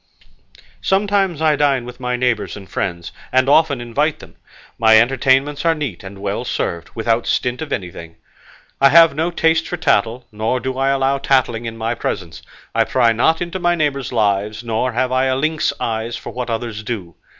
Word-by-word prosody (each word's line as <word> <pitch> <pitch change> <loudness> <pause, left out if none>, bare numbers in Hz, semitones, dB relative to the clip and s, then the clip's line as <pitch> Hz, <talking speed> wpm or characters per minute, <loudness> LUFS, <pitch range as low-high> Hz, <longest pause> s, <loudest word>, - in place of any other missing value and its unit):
Sometimes 195 -4 +1
I 155 -1 +4
dine 140 -4 +1
with 125 0 -10
my 125 -1 -2
neighbours 125 -5 -1
and 95 -1 -11
friends, 85 -3 -4 0.2
and 130 +1 +3
often 145 -2 +4
invite 140 +6 -1
them; - - -15 0.4
my 110 -1 +6
entertainments 135 +4 +2
are 165 -1 +3
neat 140 - -5
and 95 +1 -9
well 100 +4 -3
served 85 -8 -3
without 115 0 0
stint 125 +2 -1
of 160 - -6
anything. 85 -3 -5 0.7
I 140 - +7
have 165 +1 +7
no 160 +4 -1
taste 165 -1 +1
for 175 - -4
tattle, 125 -6 +1
nor 110 +4 -1
do 130 0 -4
I 135 +1 +1
allow 135 0 +1
tattling 130 -4 +1
in 115 0 -5
my 115 +1 -1
presence; 90 -8 -5 0.3
I - - +3
pry 120 -3 +2
not 160 +9 +2
into 175 +2 -5
my 175 -1 +2
neighbours' 140 -5 -1
lives, 105 -1 0
nor 120 +2 -1
have 130 +2 0
I 130 +1 +2
lynx 155 +3 0
eyes 115 +1 -3
for - - -8
what 125 -1 -5
others 115 -1 -3
do. 105 -7 -5
125 Hz, 185 wpm, -19 LUFS, 110-145 Hz, 0.7 s, I